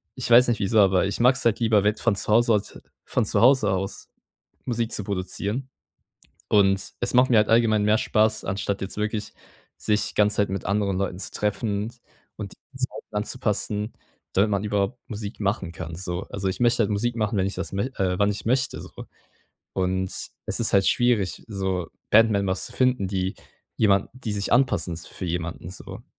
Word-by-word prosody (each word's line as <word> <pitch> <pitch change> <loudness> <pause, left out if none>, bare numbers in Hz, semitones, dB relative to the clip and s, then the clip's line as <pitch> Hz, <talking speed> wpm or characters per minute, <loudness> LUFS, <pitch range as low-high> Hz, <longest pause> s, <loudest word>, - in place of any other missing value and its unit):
ich 130 - -4
weiß 120 +1 +7
nicht 120 - +1
wieso, 105 +2 +2
aber, 95 -2 +4
ich 100 - -3
mag 125 +2 +5
es 125 - -4
halt 115 -2 +3
lieber, 110 -3 +3
wenn 105 +1 +3
von 115 -3 +1
zu - - -3
Hause 115 +1 +4
aus 105 0 -4 0.3
von - - 0
zu 105 -1 0
Hause 120 -3 +5
aus 95 +1 -3 0.5
Musik 115 -1 -2
zu 105 - -1
produzieren. 100 +6 -3 0.8
Und, 95 -2 +3
es 120 - -1
macht 125 +1 +5
mir 115 - +6
halt 105 - +3
allgemein 110 -2 +4
mehr 105 +1 +3
Spaß, 110 -2 +1
anstatt 100 +1 -2
jetzt 95 - -5
wirklich 105 0 -2 0.5
sich 105 0 0
ganze 105 0 +3
Zeit 105 - +2
mit 95 0 -4
anderen 100 0 0
Leuten 95 -2 -2
zu - - -3
treffen 105 +1 -2 0.4
und 100 -3 -6 0.2
die 130 - -12
Zeiten 130 -4 -5
anzupassen, 105 -1 -2 0.4
damit 100 +3 +3
man 100 0 0
überhaupt 105 +3 -1
Musik 105 0 -6
machen 100 -3 -1
kann, 80 0 -7
so. 90 +1 -4
Also, 100 -1 -2
ich 95 - -4
möchte 120 -1 +3
halt 105 - 0
Musik 115 +3 -1
machen, 110 -2 0
wenn 95 - +2
ich 100 - -3
das - - -5
mö 100 +2 -1
äh, 90 -1 0
wann 100 0 +3
ich 105 - -5
möchte 130 +2 0
so. - - -10 0.8
Und 95 0 -1 0.3
es - - -1
ist - - +1
halt 95 -1 +4
schwierig, 120 -7 +1
so 95 -4 -2 0.2
Band 110 +1 +6
Members 100 -2 0
zu - - -11
finden, 125 -6 +1
die 95 +1 -2 0.4
jemand 100 -2 +3
die 125 -4 -5
sich 100 -1 -2
anpassen 120 -9 +2
s 85 - -9
für - - -8
jemanden, 85 0 -4
so. 90 - -10
105 Hz, 195 wpm, -24 LUFS, 95-115 Hz, 0.8 s, weiß